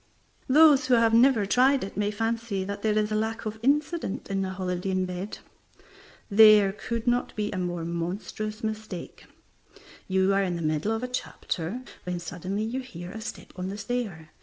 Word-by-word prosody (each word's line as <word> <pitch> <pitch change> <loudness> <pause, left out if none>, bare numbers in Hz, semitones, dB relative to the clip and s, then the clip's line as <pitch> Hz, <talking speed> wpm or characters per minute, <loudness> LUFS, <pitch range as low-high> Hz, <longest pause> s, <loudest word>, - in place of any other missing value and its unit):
Those 290 -1 +6
who 255 - +5
have 230 -1 +4
never 230 -2 +5
tried 260 +6 +3
it 195 - -7
may 205 0 0
fancy 225 -2 -2
that 200 +1 -5
there 215 -1 +1
is 210 0 +1
a - - +1
lack 220 +2 -2
of 215 +1 -4
incident 290 - 0
in 195 0 0
a 190 - -2
holiday 185 0 -3
in 185 0 +1
bed. 180 +3 -5 0.9
There 210 -2 +7
could 230 +2 -4
not 245 0 0
be 210 -1 -2
a 185 - -3
more 175 -2 -3
monstrous 195 +6 -4
mistake. 215 -4 -5 0.8
You 190 +1 +2
are 195 - +3
in 180 -3 -1
the 170 - -4
middle 155 +6 0
of 225 +2 -2
a - - -1
chapter, 240 -3 -4 0.2
when 180 -1 -3
suddenly 180 +4 -4
you 235 +4 -2
hear 180 -9 -8
a 220 - -7
step - - -8
upon 185 0 -5
the 200 - -5
stair. 200 -8 -4
210 Hz, 185 wpm, -27 LUFS, 185-230 Hz, 0.9 s, There